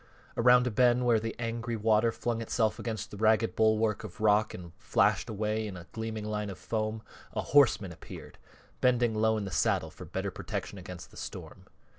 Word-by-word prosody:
Around 125 +1 +5
a 125 - 0
bend 125 +2 +3
where 115 -2 +4
the 115 +1 -4
angry 115 0 -3
water 110 +1 +3
flung 115 0 -2
itself 110 -1 0
against 110 -2 -4
the 105 - -8
ragged 110 +1 +2
bulwark 110 -1 +2
of 105 -5 -9
rock 105 0 +3
and 85 -2 -9
flashed - - +2
away 110 +1 -1
in 95 -3 -7
a 85 - -10
gleaming 110 -1 -4
line 105 -1 -2
of 95 - -7
foam, 110 -1 -3 0.3
a - - -1
horseman 120 -9 +4
appeared, 80 - -11 0.4
bending 120 -2 +3
low 110 0 +2
in 105 - -3
the 95 - -6
saddle - - +1
for - - -10
better - - -3
protection - - -5
against - - -9
the - - -15
storm. - - -8
110 Hz, 190 wpm, -30 LUFS, 105-115 Hz, 0.4 s, Around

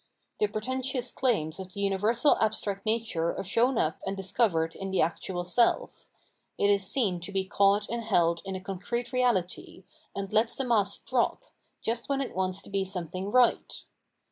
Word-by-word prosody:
The 425 - +3
pretentious 255 - -1
claims 195 -11 0
of 185 -1 -7
the - - -5
universal 210 +7 +3
abstract 210 -2 -1
nature 215 -7 0
are - - -3
shown 230 +7 +2
up 155 -5 0
and 195 +1 -3
discovered 185 -4 +1
in 195 - -5
the 190 - 0
actual 175 +1 -1
self; 230 +7 +1 0.5
it 200 - +3
is 200 -2 +1
seen 200 -9 0
to 175 +3 -6
be 195 -1 -1
caught 200 +1 +3
and 235 0 -3
held 170 -6 +2
in 190 -1 -5
a 185 - -5
con 195 -1 -6
crete 240 +6 -3
reality, 195 -7 0 0.3
and 195 -1 -4
lets 225 +2 +3
the 270 - -2
mask 210 -5 +1
drop, - - 0 0.4
just 235 +3 -2
when 275 -1 +1
it 275 - -3
wants 185 0 -1
to - - -12
be 195 -1 +1
something 185 0 -5
right. 250 +1 +2
200 Hz, 180 wpm, -28 LUFS, 185-235 Hz, 0.5 s, The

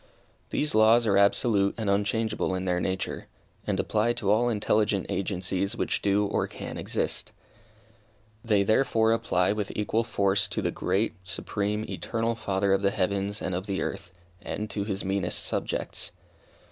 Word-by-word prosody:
These 150 - -1
laws 110 +2 +5
are 100 -3 +3
absolute 100 0 +3
and 110 -2 -3
unchangeable 105 0 0
in 95 0 -3
their 90 -1 +1
nature, 95 +1 -3 0.4
and - - 0
apply 110 +2 +1
to 100 -4 0
all 120 +3 +3
intelligent 105 -2 +1
agencies 95 +2 -1
which - - -1
do 100 +1 +2
or - - 0
can - - -7
exist. - - -2 1.1
They, 105 -3 +3
therefore, 110 +1 +3
apply 90 -5 +2
with 105 -1 -2
equal 110 +2 0
force 100 -3 +1
to - - -3
the - - +1
great, 110 +4 0
supreme, 105 +3 -2
eternal 115 0 -2
Father 100 -3 0
of 95 - +2
the 100 - +3
heavens 100 +1 -1
and 95 - -2
of 90 +3 -3
the 95 -1 -1
earth, 90 - -5 0.3
and 105 0 -4
to 100 -2 -2
His 100 -2 -3
meanest 95 -2 -1
subjects. - - -3
100 Hz, 160 wpm, -27 LUFS, 95-110 Hz, 1.1 s, laws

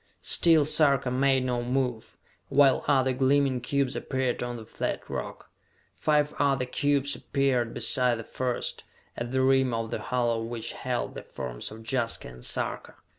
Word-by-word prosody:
Still 160 -3 +5
Sarka 140 -4 +3
made 130 0 +2
no 125 -1 -1
move, 125 -2 -2 0.3
while 140 -1 +4
other 130 -2 +3
gleaming 135 0 +2
cubes 140 +1 -1
appeared 130 -2 -2
on 120 0 -3
the 115 -2 -8
flat - - -4
rock. - - -6 0.4
Five 150 -1 +1
other 135 -3 +2
cubes 140 +2 0
appeared 130 -4 0
beside 125 -3 +2
the 115 - -6
first, 125 +2 -3 0.3
at 120 0 -5
the 130 0 +1
rim 130 -2 +3
of 115 0 -3
the - - -2
hollow 120 -3 0
which 115 0 -5
held - - -3
the - - -7
forms - - -6
of 110 +1 -11
Jaska 120 -2 -1
and 60 0 -13
Sarka. - - -2
130 Hz, 160 wpm, -27 LUFS, 120-140 Hz, 0.4 s, Still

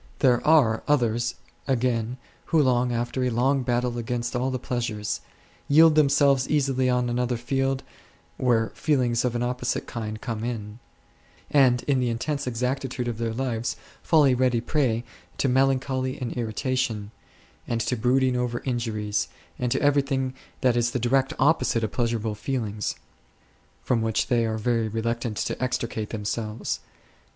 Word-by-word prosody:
There 125 -2 +3
are 135 -9 +5
others 120 -4 +1 0.3
again 125 -2 0 0.3
who 155 -5 +3
after 120 0 0
a 125 - +2
long 130 +4 +2
battle 120 -1 0
against 120 +1 -3
all 125 +2 0
the 130 - -1
pleasures8, 115 -4 -3 0.5
yield 160 +2 +7
themselves 140 -3 +4
easily 135 -3 +2
on 125 -1 +1
another 120 0 0
field, 135 +2 -1 0.5
where 115 -3 +2
feelings 125 -6 +1
of 125 -1 0
an 120 - 0
opposite 125 0 -2
kind 110 -3 -5
come 115 -1 -4
in; 110 -2 -5 0.7
and 130 -4 +4
in 140 -2 +1
the 125 -1 +1
intense 140 +4 -2
exactitude 125 +1 -2
of 120 -2 -3
their 115 -1 -1
lives 120 -1 -2 0.3
fall 155 -3 +4
a 135 - +4
ready 125 -1 +2
prey 120 -2 0 0.3
to - - +1
melancholy 130 0 +1
and 125 -2 -3
irritation, 115 -2 -2 0.6
and 115 - -1
to 115 +3 0
brooding 125 +2 +2
over 125 -1 -2
injuries, 110 -5 -1 0.3
and 125 -1 -1
to - - +2
everything 135 -2 +2 0.3
that 125 -2 +3
is 120 0 +2
the 125 - -2
direct 130 +3 +2
opposite 135 -5 +2
of 110 - -1
pleasurable 115 -3 -1
feelings; 105 -2 -3 0.9
from 120 -3 +1
which 110 -1 +1
they 115 -2 +2
are 110 0 -2
very 115 0 0
reluctant 115 0 -2
to - - -2
extricate 115 -4 -2
themselves. 110 +1 -3
125 Hz, 150 wpm, -25 LUFS, 115-130 Hz, 0.9 s, yield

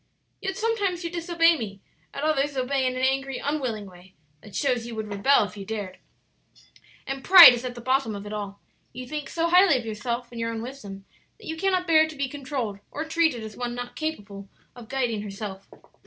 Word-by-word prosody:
"Yet 385 +1 -3
sometimes 410 -6 -1
you 335 - -4
disobey 340 -1 +3
me; 200 -3 -6 0.3
at 280 - -6
others 290 -2 0
obey 260 +1 0
in 255 - -2
an 255 - -3
angry, 270 0 0
unwilling 255 -8 -3
way 185 0 -16 0.3
that 210 - -13
shows 250 -4 0
you 235 - -7
would 220 -1 -4
rebel 220 +6 +4
if 205 - -7
you 200 - -7
dared. 200 -2 -6 1.1
"And 270 0 -5
pride 360 -8 +11
is 240 0 -4
at 250 -1 -5
the 240 - -8
bottom 255 -3 0
of 200 0 -8
it 205 - -7
all. 200 -1 -6 0.3
You 250 +1 -8
think 300 -1 -5
so 335 0 0
highly 360 -4 +6
of 240 - -6
yourself 235 +3 -4
and 235 - -8
your 230 0 -1
own 225 0 -5
wisdom 205 -7 -9 0.3
that 445 - -16
you 320 - -4
cannot 370 +1 0
bear 315 -2 +5
to 315 - -9
be 280 -1 -2
controlled 260 -7 -4
or 310 - -5
treated 320 -7 +1
as 215 -1 -8
one 245 -1 -4
not 245 0 -7
capable 205 -11 -5 0.3
of 235 -3 -12
guiding 245 -5 -1
herself. 200 -1 -7
255 Hz, 210 wpm, -25 LUFS, 215-310 Hz, 1.1 s, pride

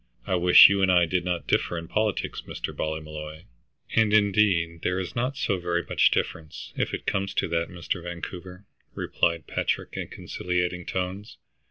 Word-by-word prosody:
I - - -2
wish 90 0 +9
you 100 0 +1
and 95 -1 +4
I 90 -1 +5
did 90 +2 -1
not 90 -2 -2
differ 85 - 0
in 85 0 -6
politics, 105 +1 -1
Mr. - - -5
Ballymolloy." 75 0 -5 0.5
"And, 110 -2 +4
indeed, 95 -5 +2
there 90 +1 0
is 90 -2 -5
not 125 +4 -1
so 95 -8 0
very 85 0 -1
much - - +4
difference, 80 -2 -4
if - - -1
it - - -5
comes 100 0 -1
to - - +1
that, 85 0 -1
Mr. 90 0 -4
Vancouver," 90 +2 -8 0.3
replied 85 -3 0
Patrick - - -2
in - - -4
conciliating 90 0 -3
tones. 95 +4 -4
90 Hz, 170 wpm, -26 LUFS, 85-95 Hz, 0.5 s, wish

